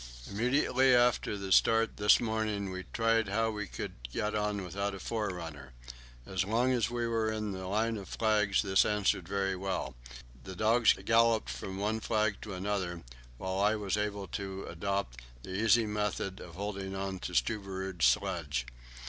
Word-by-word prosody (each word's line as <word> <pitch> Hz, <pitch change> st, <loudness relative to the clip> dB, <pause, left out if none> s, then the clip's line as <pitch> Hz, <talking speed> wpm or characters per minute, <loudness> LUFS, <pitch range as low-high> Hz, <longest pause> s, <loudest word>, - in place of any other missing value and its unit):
Immediately 125 Hz, +3 st, +3 dB
after 120 Hz, -3 st, +2 dB
the 100 Hz, -1 st, -5 dB
start 115 Hz, +3 st, +4 dB
this 105 Hz, +1 st, +6 dB
morning 110 Hz, -4 st, -1 dB
we 95 Hz, 0 st, -6 dB
tried 115 Hz, -1 st, +2 dB
how 110 Hz, +3 st, +1 dB
we 105 Hz, -2 st, -4 dB
could -, -, -6 dB, 0.2 s
get 105 Hz, -, -1 dB
on 105 Hz, -2 st, -1 dB
without 100 Hz, +3 st, -3 dB
a -, -, -8 dB
forerunner. 85 Hz, -, -4 dB, 0.5 s
As 95 Hz, 0 st, -1 dB
long 115 Hz, +6 st, +1 dB
as 120 Hz, -3 st, +1 dB
we 120 Hz, 0 st, -2 dB
were 115 Hz, -1 st, 0 dB
in 110 Hz, -1 st, -3 dB
the 95 Hz, -1 st, -5 dB
line 110 Hz, +3 st, 0 dB
of 100 Hz, -, -8 dB
flags 105 Hz, -3 st, +2 dB
this 95 Hz, -1 st, +4 dB
answered 105 Hz, -4 st, +1 dB
very 95 Hz, 0 st, 0 dB
well; 90 Hz, -8 st, -3 dB, 0.5 s
the 95 Hz, -1 st, -8 dB
dogs 115 Hz, +4 st, +4 dB
galloped 115 Hz, -1 st, +3 dB
from 95 Hz, 0 st, -6 dB
one 105 Hz, +3 st, 0 dB
flag 110 Hz, -2 st, 0 dB
to 105 Hz, -3 st, -6 dB
another, 90 Hz, -3 st, -2 dB, 0.3 s
while 95 Hz, +3 st, -3 dB
I 105 Hz, +2 st, +3 dB
was 105 Hz, -2 st, -1 dB
able 105 Hz, -1 st, -2 dB
to 95 Hz, -1 st, -5 dB
adopt 90 Hz, -8 st, -3 dB, 0.2 s
the -, -, -8 dB
easy 115 Hz, +3 st, +4 dB
method 105 Hz, -2 st, -2 dB
of 85 Hz, -2 st, -10 dB
hanging 100 Hz, -1 st, -4 dB
on 95 Hz, -1 st, -3 dB
to -, -, -6 dB
Stubberud's 95 Hz, -, 0 dB
sledge. 70 Hz, 0 st, 0 dB
100 Hz, 165 wpm, -31 LUFS, 95-110 Hz, 0.5 s, this